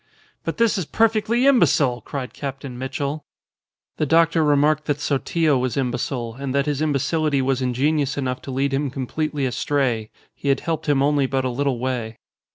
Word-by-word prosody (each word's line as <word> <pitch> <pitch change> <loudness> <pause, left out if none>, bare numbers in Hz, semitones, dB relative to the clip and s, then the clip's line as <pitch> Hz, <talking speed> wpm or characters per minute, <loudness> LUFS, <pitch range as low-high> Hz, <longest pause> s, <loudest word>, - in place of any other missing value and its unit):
'" - - -36
"But - - -3
this 230 -3 +2
is 180 - -2
perfectly 225 - +2
imbecile!" 145 - +4
cried 130 +2 -6
Captain 135 -2 -6
Mitchell. 140 +3 -3 0.7
The 155 - 0
doctor 165 +1 +4
remarked 150 +1 +3
that 145 -1 -1
Sotillo 150 0 +1
was 125 -1 -2
imbecile, 125 -2 -2
and 140 -1 -3
that 140 0 +2
his 145 -1 -1
imbecility 150 0 +1
was 135 0 0
ingenious 140 +3 0
enough 130 -2 -2
to 135 - -7
lead 135 +1 0
him 140 +1 0
completely 140 +2 -2
astray. 125 -4 0 0.2
He 140 - -4
had 135 -1 +2
helped 160 -2 -2
him 135 -2 +3
only 145 -1 +2
but 130 0 -1
a - - +1
little 135 0 0
way. 120 -3 -3
140 Hz, 175 wpm, -22 LUFS, 130-155 Hz, 0.7 s, imbecile